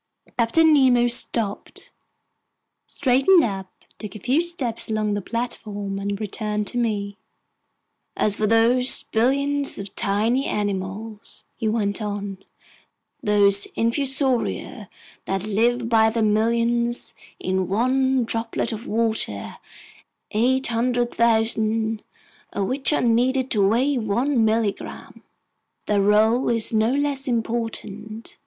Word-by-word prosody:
Captain 310 +7 +4
Nemo 255 -4 +4
stopped, 230 -3 -2 1.0
straightened 285 +7 +3
up, 195 -3 -4 0.3
took 210 -3 -8
a - - -7
few 260 - +1
steps 285 -12 -2
along 215 -1 0
the 205 - -2
platform, 205 -3 -4
and 200 0 -3
returned 210 0 -3
to 245 - -3
me: 200 -3 -2 1.0
"As 205 -1 +1
for 215 - +1
those 235 +3 +3
billions 280 +5 +1
of 200 -1 -6
tiny 225 +7 +1
animals," 205 +2 -4
he 225 - -3
went 215 -1 -1
on, 205 -2 -4 0.8
"those 200 -1 +3
infusoria 265 +1 -1 0.4
that 195 -1 -2
live 230 +3 +1
by 225 -1 +4
the 225 0 -1
millions 235 +2 +1 0.3
in 185 -1 -1
one 255 +5 +1
droplet 225 +1 -2
of 220 +1 -6
water, 220 - -1 0.7
800,000 230 -2 +1 0.5
of 200 - -1
which 270 +5 +1
are 300 - +1
needed 250 +3 +1
to 200 -4 +3
weigh 255 +6 +1
one 235 +4 +1
milligram, 220 -2 -2 0.6
their 205 -1 +1
role 215 +5 +3
is 230 -1 0
no 220 +1 +2
less 280 0 -1
important. 225 -2 -4
225 Hz, 110 wpm, -23 LUFS, 210-245 Hz, 1.0 s, Captain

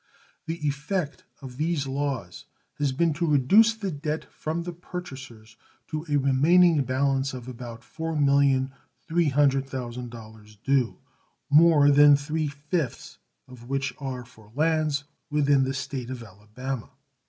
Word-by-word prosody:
The 165 -2 -3
effect 150 +3 -3 0.2
of 125 -2 -9
these 155 -1 0
laws 135 -9 -3 0.3
has 145 -2 +1
been 160 +4 +1
to 170 +4 -1
reduce 195 - +5
the 200 -4 -4
debt 150 +1 -3
from 160 +2 -3
the 175 0 -5
purchasers 130 -11 -9 0.3
to 155 +1 -4
a 145 - +1
remaining 150 +4 +4
balance 135 +1 0
of 125 -1 -8
about 120 -2 -8
$4,300,000 135 -6 -1
due, 135 -4 +1 0.5
more 150 -1 +6
than 145 0 +7
three 150 +2 -2
fifths 145 0 -4 0.3
of 125 -1 -13
which 135 0 -1
are 130 -3 -5
for 110 -3 -19
lands 155 -1 +1 0.3
within 145 -2 +3
the 135 - -2
State 130 -2 -4
of 130 -2 -6
Alabama. 110 +5 -7
140 Hz, 125 wpm, -26 LUFS, 130-155 Hz, 0.5 s, than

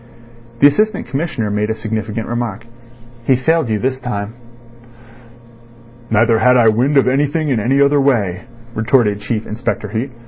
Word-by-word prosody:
The 140 - +8
Assistant 215 +8 0
Commissioner 135 -6 -3
made 105 +1 -1
a 110 - -1
significant 110 0 -4
remark. 120 -2 -4 0.6
"He 130 - +4
failed 155 +2 +1
you 110 - +1
this 130 +4 -2
time." 105 -4 -4 1.8
"Neither 115 +1 +3
had 125 +1 +4
I 115 -2 +5
wind 130 +7 +1
of 135 - +4
anything 145 +4 0
in 125 -5 +1
any 130 +6 +1
other 140 0 +4
way," 105 -10 0 0.3
retorted 110 -2 +1
Chief 110 0 -3
Inspector 110 0 -3
Heat. 115 +6 -3
120 Hz, 150 wpm, -17 LUFS, 110-140 Hz, 1.8 s, The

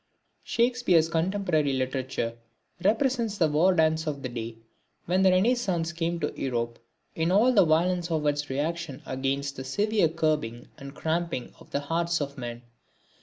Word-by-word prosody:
Shakespeare's 235 -9 +2
contemporary 165 -4 +1
literature 130 -2 -2 0.5
represents 230 0 +1
the 165 -5 +4
war 155 +5 +4
dance 160 -1 +2
of 145 -2 -3
the 130 - -3
day 115 -1 -6 0.5
when 185 +2 +2
the 190 - +6
Renascence 185 -4 +2
came 170 0 -1
to 150 - -1
Europe 120 -3 -2 0.3
in 165 +2 0
all 225 +7 +5
the 200 -6 +6
violence 175 +2 +2
of 155 -2 -1
its 145 0 0
reaction 150 +1 -3
against 135 +1 -2
the 130 - -5
severe 205 +6 +1
curbing 155 -8 -1
and 140 +1 -9
cramping 160 -4 -2
of - - -16
the 140 - -1
hearts 170 +3 0
of 140 -1 -4
men. 120 -2 -6
160 Hz, 155 wpm, -27 LUFS, 140-180 Hz, 0.5 s, the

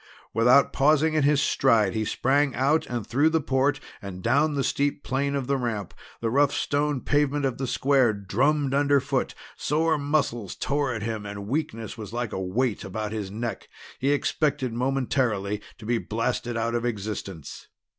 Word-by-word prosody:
Without 125 +5 +5
pausing 155 +3 +3
in 155 - +2
his 145 0 +3
stride 115 -9 +3
he 110 - -1
sprang 135 +5 +1
out 140 +5 +2
and 120 -4 -3
through 145 +8 +3
the 160 0 +2
port 140 0 +1 0.2
and 95 -3 -8
down 145 +6 +2
the 140 - 0
steep 145 +3 0
plane 140 +3 -1
of 135 -2 -1
the 140 +1 +1
ramp. 115 -7 -3 0.3
The 115 -1 0
rough 140 +2 +4
stone 145 -2 0
pavement 145 -1 +1
of 130 -2 -2
the 135 - -2
square 135 -2 +3
drummed 135 +8 0
underfoot; 140 -1 +1 0.2
sore 160 +1 +1
muscles 140 -8 -1
tore 145 -2 -1
at 110 -3 -4
him, 110 -1 -3
and 100 0 -6
weakness 115 -4 -3
was 105 0 -7
like 120 -2 -3
a 95 - -3
weight 110 +5 -1
about 105 +2 -4
his 105 -3 -4
neck. 115 +4 -5 0.3
He 135 - +1
expected 145 -3 0
momentarily 120 -5 0 0.2
to 115 - -12
be 120 +1 +1
blasted 115 +2 -2
out 115 +1 -1
of 120 0 -1
existence. 100 - -5
130 Hz, 175 wpm, -26 LUFS, 110-145 Hz, 0.3 s, Without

